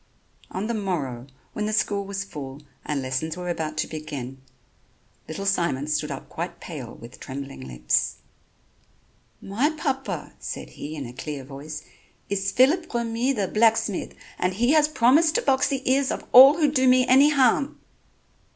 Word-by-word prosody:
On 190 +3 -4
the 235 - -2
morrow, 150 - -3 0.3
when 210 - -2
the 215 - -2
school 205 -1 +1
was 200 0 -4
full 145 -6 -8 0.2
and 145 -3 -2
lessons 130 +6 -2
were 180 0 -4
about 155 -2 -3
to - - 0
begin, 135 -4 -7 0.9
little 195 +5 -5
Simon 170 -8 +1
stood 150 0 -1
up 135 -2 -6
quite 170 +2 -6
pale 140 -9 -8
with 120 +2 -13
trembling 135 0 -7
lips: 60 -1 0 1.3
"My 230 +10 +1
papa," 275 -4 -3
said - - -6
he 155 +2 -7
in 145 -3 -5
a 120 - -9
clear 145 +1 -6
voice, 150 +3 -8 0.5
"is 195 0 0
Phillip 295 +8 +3
Remy, 235 +2 0
the 205 -6 -1
blacksmith, 220 -2 +1 0.2
and 180 +1 0
he 240 +6 +2
has 305 -1 +5
promised 305 +4 +4
to - - +2
box 265 -1 +3
the 270 -1 -3
ears 265 +1 +3
of - - -3
all 270 +4 +10
who 300 -4 +3
do 260 -3 +2
me 255 0 +5
any 270 +4 +6
harm." 275 0 +2
195 Hz, 165 wpm, -24 LUFS, -, 1.3 s, all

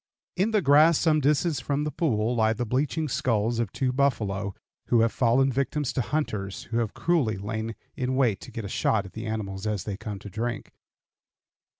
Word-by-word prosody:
In 190 +4 +2
the 215 -4 +1
grass 150 +3 +6
some 155 -2 +3
distance 150 +1 +2
from 140 +3 -1
the 150 - -2
pool 120 -8 0
lie 110 0 +3
the 120 +2 -3
bleaching 145 +7 0
skulls 115 -3 0
of 115 -5 -1
two 130 -1 -1
buffalo 105 -8 0 0.3
who 120 -2 +4
have 115 0 +3
fallen 130 +2 +3
victims 140 +2 -1
to - - 0
hunters 105 -8 -3
who 115 - +1
have 115 -3 -2
cruelly 145 - +1
lain 110 +3 -4 0.2
in 130 0 -1
wait 120 -7 +2
to - - -10
get 115 -2 -5
a - - -3
shot 105 +1 +1
at 95 - -11
the 110 0 -6
animals 105 -2 -4
as 105 -3 -1
they 100 -2 -4
come 105 -1 -6
to 100 - -9
drink. 115 +3 -3
120 Hz, 200 wpm, -26 LUFS, 105-140 Hz, 0.3 s, grass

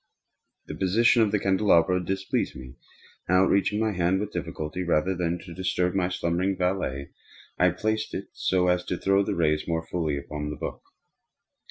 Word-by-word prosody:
The - - -7
position 110 +8 +3
of 110 -2 +3
the 105 - +2
candelabrum 95 -2 +3
displeased 95 +1 -2
me, 65 -1 -10 0.5
and 90 - +4
outreaching 100 +2 +2
my 110 -1 +1
hand 90 0 +1
with 105 +1 -4
difficulty, 80 +4 -4
rather 85 +1 +1
than 85 -1 -1 0.2
disturb 90 -1 0
my 95 -2 +1
slumbering 90 +2 -1
valet, 90 -7 -2 0.5
I - - +5
placed 110 0 -2
it - - -5
so 90 -1 +1
as 90 0 +2
to 90 - -2
throw 95 +2 +2
its 100 - 0
rays 75 -2 +1
more 80 -1 -1
fully 80 -5 -2
upon 75 +1 -5
the 75 - -4
book. - - -6
90 Hz, 170 wpm, -26 LUFS, 85-95 Hz, 0.5 s, I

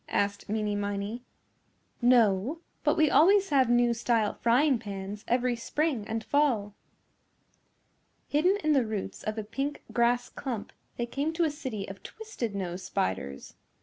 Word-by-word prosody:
asked 200 0 -1
Meeney 210 -1 0
Miney. 205 +3 -3 0.8
"No, 240 - +3 0.2
but - - +2
we 310 -2 +4
always 390 +4 +5
have 265 -5 +3
new 240 0 +4
style 230 -2 +1
frying 255 +2 +3
pans 200 -1 -6
every 245 0 +1
spring 250 -1 -1
and 225 0 -3
fall." 240 -9 +1 1.5
Hidden 355 +7 +3
in 310 - +2
the 270 -3 +4
roots 215 -3 -4
of 215 +1 -4
a 220 - -2
pink 275 +7 -4
grass 240 +1 +2
clump, 245 -7 -5 0.2
they 240 - -1
came 280 +6 -2
to 340 +1 +1
a 315 - +2
city 260 -10 -5
of 195 0 -9
twisted 420 - -6
nose 185 -2 -4
spiders. 90 - -3
235 Hz, 150 wpm, -29 LUFS, 205-285 Hz, 1.5 s, always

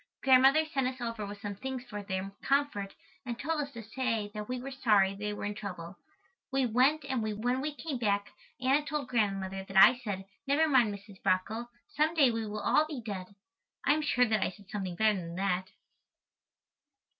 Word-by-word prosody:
Grandmother 270 +4 +6
sent 275 -4 -1
us 255 0 -4
over 230 -3 -4
with 205 0 -8
some 205 0 -4
things 260 +4 -5
for 210 -5 -7
their 195 -1 -4
comfort 275 -8 0 0.3
and 240 -3 -4
told 310 +3 -1
us 285 -1 -5
to 230 -1 -7
say 225 -2 -2
that 210 +1 -6
we 255 0 -2
were 270 +2 -6
sorry 210 -7 +3
they 210 +1 -4
were 205 - -5
in 205 - -2
trouble. 185 -4 -7 0.6
We 270 -1 +2
went 265 +6 +3
and 260 -4 -1
when 220 +4 -1
we 300 +1 -3
came 290 -4 -4
back 200 -3 0 0.3
Anna 270 +4 +3
told 295 -3 -3
Grandmother 195 -4 -1
that 195 0 -4
I 220 +7 +8
said, 200 -6 -4 0.2
"Never 300 +3 +3
mind, 255 -7 +4
Mrs. 200 -1 -11
Brockle, 200 +5 0 0.2
some 320 -4 +1
day 275 -6 +5
we 225 -1 -3
will 210 0 -4
all 310 +8 +3
be 300 -4 -5
dead." 200 -3 -6 0.5
I 285 - +5
am 310 - 0
sure 255 -4 +3
that 220 -3 +1
I - - +1
said 200 +1 -15
something 190 -4 -3
better 215 0 +3
than 170 -1 -7
that. 185 -1 0
225 Hz, 200 wpm, -31 LUFS, 200-265 Hz, 0.6 s, I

